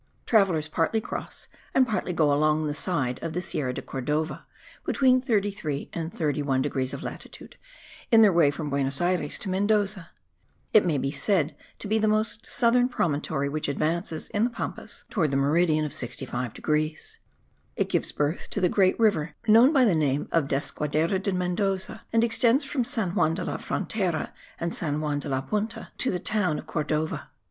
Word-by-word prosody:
Travellers 190 -9 +3
partly 165 +8 0
cross - - -6 0.3
and 260 -1 +5
partly 215 -5 -1
go 155 -4 +2
along 155 +1 +2
the 150 - -1
side 145 -6 -1
of 165 -1 -4
the 175 - -1
Sierra 145 -7 -1
de - - -6
Cordova 150 +4 -3 0.4
(between 255 -2 +3
33 200 - -1
and 165 -1 -4
31 145 -5 0
degrees 130 -2 -1
of - - -6
latitude) - - -8 0.6
in 225 -1 +8
their 205 -3 +5
way 165 -4 +5
from 145 0 -4
Buenos 140 0 0
Ayres 175 -4 0
to 195 - -4
Mendoza; 200 -2 +1 0.6
it 210 -4 +6
may 155 -4 +1
be 135 +1 -1
said 165 -2 +1 0.2
to - - -6
be 220 +2 +2
the 215 - +2
most 215 +1 0
southern 245 +1 +3
promontory 145 - -1
which 150 +2 -2
advances, 160 +3 -1
in 215 -1 0
the 240 - +2
Pampas, 240 - -5
towards 165 -9 +1
the 135 - 0
meridian 155 +2 +2
of 145 - -4
65 125 -3 -4
degrees; 155 0 -2 0.6
it - - 0
gives - - 0
birth 150 +3 -2
to - - -3
the 180 -2 +3
great 190 +2 +3
river 165 -9 +2
known 230 +6 +7
by 270 -5 +5
the 210 - +4
name 145 -3 +1
of 165 -4 +2
Desaguadero 150 +6 0
de 200 - 0
Mendoza 190 +3 -1
and 230 0 +3
extends 235 +4 +3
from 270 -2 -1
San 220 -6 -1
Juan 165 -4 +2
de - - -3
la - - -3
Frontera 185 -8 -2 0.3
and 170 0 -2
San 150 -3 -2
Juan 150 -2 -1
de 145 - -6
la 130 -1 0
Punta 210 - -3
to 260 - +2
the 180 - 0
town 180 -5 0
of - - -7
Cordova. 155 0 -2
165 Hz, 185 wpm, -26 LUFS, 150-210 Hz, 0.6 s, in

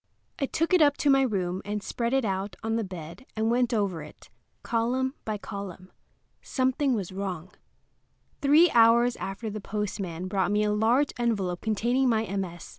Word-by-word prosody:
I 275 - 0
took 330 +6 -1
it 365 - +6
up 290 -1 +5
to 285 - +3
my 270 0 +5
room 190 -7 -1
and 205 0 -4
spread 235 +3 -2
it 265 -2 +2
out 195 -1 -2
on 225 0 0
the 230 - 0
bed 175 +2 -9
and 220 +1 +1
went 245 0 +2
over 200 -7 0
it, 150 - -13 0.3
column 250 +3 0
by 215 -1 -2
column. 195 -3 -8 0.5
Something 260 0 +1
was 195 -5 -4
wrong. 185 -2 -5 0.9
Three 300 +5 +6
hours 235 +1 +5
afterward 200 +3 -5
the 215 - -5
postman 195 -4 -4
brought 190 -1 0
me 210 +1 +2
a 210 - +1
large 235 +7 +2
envelope 200 -7 0
containing 240 +4 +1
my 220 -2 +2
MS. 175 -3 -4
215 Hz, 175 wpm, -27 LUFS, 190-245 Hz, 0.9 s, it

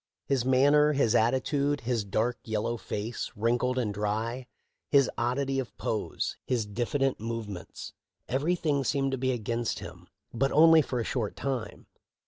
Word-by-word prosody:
His 135 -4 +1
man 130 +2 +4
ner, 150 0 +5
his 135 -6 +2
attitude, 140 +5 +1
his 115 -2 -1
dark, 110 +5 -1
yellow 110 +1 -1
face, 110 +1 -4
wrinkled 120 +4 +1
and 110 -5 0
dry, 110 +5 -2 0.4
his 140 -3 +4
oddity 135 +3 0
of 130 - -6
pose, 110 - -2
his 120 -4 -1
diffident 125 +6 -1
movements 110 -4 -6 0.2
— - - -62
everything 145 +1 0
seemed 135 +1 0
to 135 - -2
be 130 0 +1
against 115 -1 -2
him, - - -10 0.3
but 135 +4 +1
only 160 +1 +7
for 130 -3 -3
a - - 0
short 115 -3 -2
time. 130 -6 -4
125 Hz, 155 wpm, -28 LUFS, 115-135 Hz, 0.4 s, only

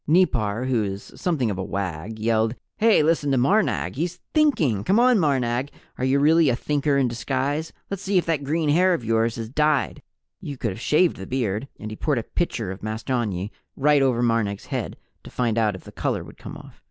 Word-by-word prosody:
Nipar, 125 - +2
who 125 -4 +1
is 100 0 -6
something 140 - 0
of 95 - -4
a - - -2
wag, 95 +2 -4
yelled: 110 +1 +1 0.2
"Hey, 220 -7 +4
listen 155 -2 +1
to 135 - +2
Marnag 195 - +2
he's 175 +3 -2
Thinking! 165 - +2
Come 200 +4 +3
on, 245 -2 +5
Marnag, 130 -4 0 0.3
are - - -2
you 130 +2 +3
really 155 +2 +4
a 120 - +2
Thinker 145 +2 0
in 135 -2 +3
disguise? 135 +6 -2 0.2
Let's 200 -1 -3
see 195 0 +1
if 180 - +2
that 160 -4 0
green 155 +2 0
hair 180 +4 +4
of 120 - -6
yours 115 +1 +1
is 115 -1 -5
dyed 150 0 +1 0.4
you 140 -2 -7
could 115 -3 -2
have 110 - -8
shaved 155 +8 +2
the 95 - -8
beard!" 120 -2 -2
And 110 - -6
he - - -5
poured 150 -4 0
a 115 - -1
pitcher 115 - -2
of 95 - -8
mastonyi 110 -3 -2 0.2
right 145 0 +3
over 125 -3 +2
Marnag's 115 -4 0
head - - -4 0.3
to - - -10
find 120 -3 -1
out 110 -3 +1
if 95 - -11
the - - -12
color - - -2
would - - -14
come - - -8
off. - - -13
130 Hz, 215 wpm, -24 LUFS, 110-155 Hz, 0.4 s, on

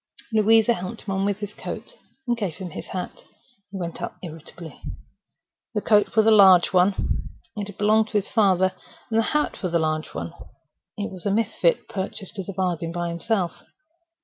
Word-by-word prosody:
Louisa 220 +1 +5
helped 200 +2 -6
him 195 - -4
on 190 +1 0
with 200 -1 0
his 205 0 -5
coat, - - -7 0.3
and 240 - +2
gave 200 -9 -3
him 185 -3 -7
his - - -7
hat. 185 -1 -6 0.5
He 195 - -7
went 170 -2 -5
out - - -4
irritably. 165 0 -10 0.9
The 210 - +1
coat 210 -1 +3
was 220 -1 +5
a 225 - +6
large 190 -4 +7
one 185 +2 +2 0.3
(it 205 -1 -4
had 205 - -10
belonged 215 +1 +3
to - - -15
his 200 - -1
father); 190 -4 +3 0.4
the 225 0 +4
hat 300 +6 0
was 180 -3 -2
a - - +7
large 155 -1 -1
one 85 +1 -4 0.6
(it 205 0 -3
was 185 0 -6
a - - +2
misfit 200 -5 +1
purchased 195 +1 -5
as 195 - -5
a - - -4
bargain 175 -3 -1
by 175 0 -2
himself). 170 +1 -1
195 Hz, 185 wpm, -24 LUFS, 175-210 Hz, 0.9 s, large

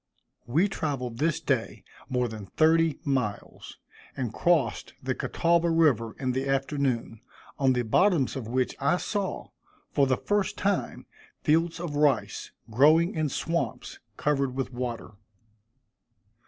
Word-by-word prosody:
We 160 +11 +3
traveled 130 - -3
this 160 -1 +1
day - - -2 0.3
more 125 -2 0
than 110 -3 -8
thirty 160 - +3
miles, 125 -8 -3 0.4
and 120 -4 -3
crossed 170 0 +1
the 130 0 -2
Catawba 170 +5 +1
river 145 -9 +2
in 130 -2 0
the 130 +2 -2
afternoon, 135 -5 -1 0.4
on 135 -2 +4
the 125 -1 0
bottoms 155 - +2
of 125 -5 -5
which 125 +2 -1
I 140 +6 +2
saw, 200 0 -3 0.4
for 140 - +3
the 130 -1 +2
first 205 -2 -1
time, 200 -1 -1 0.4
fields 165 +2 +2
of 170 -4 -4
rice, 145 -6 +1 0.2
growing 155 - +5
in 155 -2 -1
swamps 165 -3 -3 0.2
covered 140 -3 0
with 135 -1 -3
water. 120 -3 -4
140 Hz, 130 wpm, -27 LUFS, 125-165 Hz, 0.4 s, growing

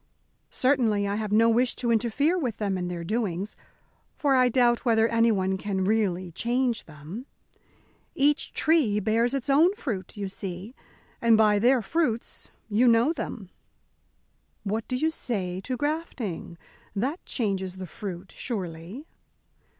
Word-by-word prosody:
Certainly 230 -7 +2
I 200 - -1
have 215 -2 -3
no 225 +2 +5
wish 240 +2 +2
to 240 -2 -1
interfere 240 +9 +2
with 255 - -2
them 200 -3 -1
in 180 -1 -2
their 175 -1 -4
doings, 200 -1 -2 0.6
for 285 -2 +2
I 255 -1 +5
doubt 240 -1 +3
whether 225 -2 +3
anyone 210 -5 +2
can 190 -1 -1
really 185 -4 0
change 240 +4 0
them. 160 - -9 0.9
Each 290 +2 +2
tree 290 -11 +2
bears 225 +5 +1
its 270 - -3
own 320 +8 +4
fruit, 210 - -5
you 200 -1 -3
see, 190 +3 -6 0.5
and 230 -1 +5
by 210 -2 +4
their 245 +2 +4
fruits 245 -3 -2 0.2
you 225 +3 +3
know 235 +6 +4
them." 205 - -6 1.1
"What 215 +2 -2
do 255 - -2
you 315 +5 +1
say 190 - -3
to 255 -1 -2
grafting? 270 - -3 0.4
That 265 - -2
changes 190 -5 -1
the 185 - -5
fruit, 185 +1 -7
surely?" 185 - -6
225 Hz, 140 wpm, -26 LUFS, 195-255 Hz, 1.1 s, no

